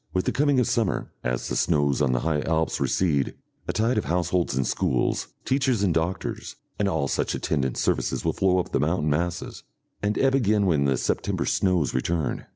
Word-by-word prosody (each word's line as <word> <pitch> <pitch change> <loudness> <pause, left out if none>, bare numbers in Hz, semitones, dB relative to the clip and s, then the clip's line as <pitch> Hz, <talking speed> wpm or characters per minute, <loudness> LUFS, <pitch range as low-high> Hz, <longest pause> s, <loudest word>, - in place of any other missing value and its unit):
With 90 - +1
the - - +1
coming 145 -1 +2
of 125 - +3
summer, 110 -5 0
as - - -2
the - - -3
snows 75 -4 +2
on 70 -3 +2
the 60 - 0
high 80 -2 0
Alps 80 0 0
recede, 75 -8 +1 0.3
a - - 0
tide 115 +4 +1
of - - -5
households 85 -1 0
and 65 0 +1
schools, 60 - 0 0.2
teachers 130 -5 +1
and 90 -4 +2
doctors, 85 +3 -3 0.2
and 100 - +2
all 80 -6 0
such - - -1
attendant 65 -5 -1
services - - 0
will - - +1
flow 95 -1 +2
up 90 - -2
the - - +1
mountain 75 0 +1
masses, 85 +3 -2 0.4
and 105 +1 0
ebb 135 -1 +3
again 105 -6 +2
when 75 -6 +2
the 70 -2 +2
September - - -1
snows 90 -7 +1
return. 80 +5 -1
85 Hz, 195 wpm, -25 LUFS, 75-100 Hz, 0.4 s, of